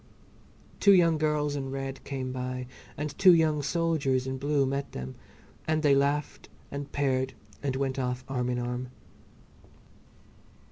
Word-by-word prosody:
Two 200 - +7
young 165 -4 +5
girls 150 -1 +1
in 135 -2 -3
red 135 0 -5
came 130 -2 -4
by 125 0 -4 0.3
and 150 -1 -4
two 185 -3 +8
young 155 -2 +2
soldiers 145 -4 +1
in 130 0 -3
blue 145 0 +2
met 140 +1 -3
them, 65 0 -5 0.5
and 155 0 +1
they 145 -2 +5
laughed 140 +2 0 0.2
and 140 0 -5
paired 130 -2 0 0.3
and 135 -2 -1
went 135 0 -1
off 125 0 -2
arm 125 -2 -1
in 125 - 0
arm. 125 +1 -3
140 Hz, 145 wpm, -28 LUFS, 130-150 Hz, 0.5 s, two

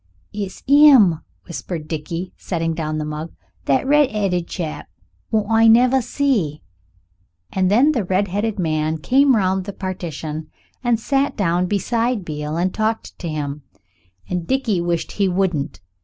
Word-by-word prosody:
"It's 200 -2 -6
'im," 270 - +6 0.2
whispered 170 -2 -6
Dickie, 165 +3 -5
setting 165 -2 -2
down 155 -1 -3
the 155 - -2
mug. 150 +2 -6 0.3
"That 140 - +2
red'eaded 210 - +2
chap 160 -4 -5 0.4
wot 215 -2 +1
I 225 0 +5
never 250 +3 +5
see." 230 - -1 0.9
And 185 -1 +2
then 250 +9 +5
the 245 -8 0
redheaded 200 +3 -1
man 155 -2 0
came 265 - +3
round 190 -2 +1
the 200 - -6
partition 160 -5 -5 0.4
and 240 -2 +2
sat 275 +4 0
down 180 -2 +1
beside 230 +2 0
Beale 150 0 -4
and 180 +2 0
talked 220 +1 -2
to 170 - -4
him, 150 -1 -4 0.7
and 180 -2 -3
Dickie 245 -9 0
wished 170 -1 -2
he 200 -1 +1
wouldn't. 175 - -1
185 Hz, 140 wpm, -20 LUFS, 160-225 Hz, 0.9 s, im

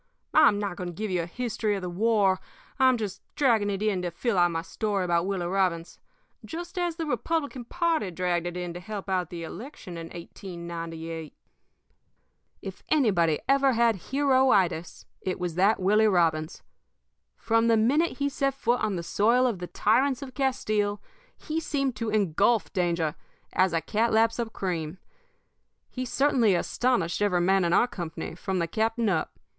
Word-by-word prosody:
I'm 300 -10 +6
not 200 -3 -3
going 180 - -4
to 175 - -9
give 215 +2 -3
you 180 -2 +1
a 165 - -5
history 220 +1 -2
of 195 - -5
the - - -3
war, 195 0 +2 0.4
I'm 260 -1 +5
just 205 -3 -5
dragging 230 -7 +3
it 200 +1 -2
in 205 -4 +1
to 180 - -2
fill 220 +6 -2
out 175 -1 +4
my 165 -1 -3
story 200 -1 -2
about 170 0 +1
Willie 190 -3 -2
Robbins, 180 -2 -1 0.4
just 345 +3 -6
as 350 -2 -1
the 330 -1 -3
Republican 290 -5 -2
party 330 - 0
dragged 175 0 -1
it 175 0 -5
in 175 -1 -4
to 175 - -7
help 200 +2 -7
out 185 -3 0
the 170 -1 -6
election 180 - -8
in 165 - -7
1898. 165 -2 -7 1.3
"If - - -7
anybody 185 - +2
ever 275 -1 +4
had 230 -1 +3
heroitis, 260 - +2 0.2
it 185 -1 -3
was 180 -2 -2
that 195 +6 +3
Willie 210 +4 +4
Robbins. 165 -4 +1 0.7
From 230 0 +2
the 230 -1 +4
minute 280 +10 +2
he 280 - 0
set 275 -1 -1
foot 245 -2 0
on 205 - 0
the 170 - -4
soil 235 +8 +3
of 230 -7 0
the 180 - -5
tyrants 260 +8 +1
of 260 -2 -9
Castile 215 -7 0 0.4
he 315 0 -3
seemed 275 -5 -1
to 225 0 -2
engulf 205 +2 +2
danger 170 -4 0 0.4
as 185 0 +3
a 165 0 0
cat 220 +8 0
laps 225 +2 +3
up 230 -1 -2
cream. 170 -4 -3 0.9
He 255 0 -4
certainly 250 -6 +3
astonished 205 -2 0
every 190 -4 +2
man 190 +2 +3
in 170 - +1
our 195 - +5
company, 170 -8 -6
from 185 +2 -3
the 170 - +1
captain 225 +5 0
up. 165 -6 -1
205 Hz, 175 wpm, -27 LUFS, 175-245 Hz, 1.3 s, I'm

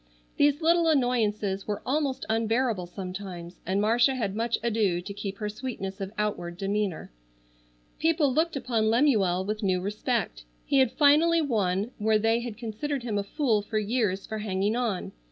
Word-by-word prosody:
These 290 +2 +3
little 335 +1 +4
annoyances 215 -9 +1
were 205 -1 -3
almost 275 0 -1
unbearable 225 -3 0
sometimes 180 -1 -7
and 190 +2 +1
Marcia 235 +5 +3
had 205 -6 -2
much 230 +1 0
ado 210 -6 +1
to 195 +3 -7
keep 200 -1 -5
her 210 - -3
sweetness 210 -3 -5
of 195 0 -4
outward 175 -5 -2
demeanor. 195 - -2 0.9
People 315 -4 +2
looked 325 +3 +1
upon 230 -5 0
Lemuel 215 -8 +3
with 215 +1 -3
new 185 -3 +1
respect. 210 - -2 0.2
He 275 - +3
had 260 -3 +4
finally 315 +3 +4
won 210 - 0
where 215 +1 +3
they 225 +2 +2
had 235 -3 -6
considered 245 +4 -4
him 215 -4 -1
a - - -1
fool 225 -1 +1
for 215 +2 -3
years 210 -3 0
for 220 -1 -5
hanging 205 +1 0
on. 235 -7 -2
220 Hz, 165 wpm, -27 LUFS, 195-255 Hz, 0.9 s, little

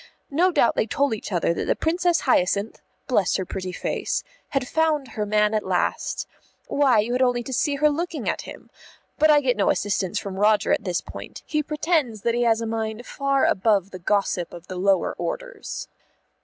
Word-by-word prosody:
no 350 +6 +3
doubt 240 - +3
they 220 - +1
told 280 +2 +1
each 215 - -6
other 170 -2 +1
that - - -3
the - - +2
Princess 345 +1 +1
Hyacinth 200 -3 +1 0.2
(bless 205 -8 +2
her 190 - -1
pretty 185 0 -5
face!) - - -2 0.3
had 275 -3 -1
found 310 -3 +1
her 210 -2 -3
man 210 +1 +2
at 215 - +1
last. - - -1 0.4
Why, 275 -5 +3
you 225 +4 +1
only 245 -2 +2
had - - -11
to 265 - -5
see 285 +3 +1
her 300 +2 +3
looking 330 +1 -3
at - - 0
him. - - -11 0.5
But 310 - +5
I 295 -1 +6
get 250 -3 +1
no 200 - +2
assistance 200 -1 0
from 195 -2 -4
Roger 210 0 +3
at 215 - -1
this 180 -2 -1
point; - - -10
he 305 -1 0
pretends 300 - 0
that 235 +3 +1
he 240 - 0
has 230 -1 +3
a - - -2
mind 220 +1 -3
far 275 -1 +1
above 200 -1 +2
the 185 - -8
gossip 180 -1 0
of 170 0 -11
the 185 - -7
lower 190 0 +2
orders. - - -5
230 Hz, 200 wpm, -24 LUFS, 200-290 Hz, 0.5 s, I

